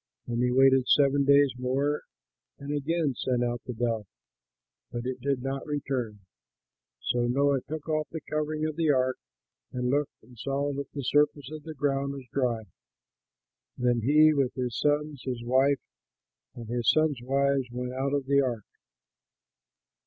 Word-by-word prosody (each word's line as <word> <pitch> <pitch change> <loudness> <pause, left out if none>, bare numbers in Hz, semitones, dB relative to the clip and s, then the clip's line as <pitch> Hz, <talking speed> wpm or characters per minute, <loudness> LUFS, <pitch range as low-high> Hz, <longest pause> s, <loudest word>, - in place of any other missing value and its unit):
And 120 0 -2
he 125 - +2
waited 130 0 +5
seven 140 -1 +4
days 140 -1 +5
more 140 +4 0 0.6
and 140 +1 -5
again 150 0 0
sent 125 0 -1
out 120 0 -2
the 125 - -3
dove, 115 -3 -1 0.8
but 120 0 -4
it 130 0 -4
did 135 -1 -1
not 135 0 -3
return 135 -6 -2
to - - -17
him. 100 -2 -24 0.8
So 120 0 0
Noah 140 +2 +2
took 155 +3 -7
off 155 -1 0
the 165 - -5
covering 155 +1 -2
of 155 0 -3
the 165 -2 +2
ark 130 -2 +2 0.5
and 125 0 -1
looked 145 0 -1
and 125 -3 -17
saw 140 +3 -1
that 140 0 -5
the 140 - -4
surface 145 0 +1
of 155 -1 -7
the 160 -1 -7
ground 140 0 0
was 135 -2 -8
dry. 120 -5 0 1.1
Then 120 -1 +1
he, 155 +5 +5
with 135 -4 0
his 125 -3 -2
sons, 150 -1 0
his 125 -3 -4
wife, 135 +3 +3 0.8
and 115 - -8
his 120 0 +1
sons' 155 -4 +3
wives, 135 0 +1
went 125 +1 -4
out 135 +2 -1
of 140 -2 -1
the 140 +1 +4
ark. 120 -5 -2
135 Hz, 165 wpm, -28 LUFS, 125-145 Hz, 1.1 s, waited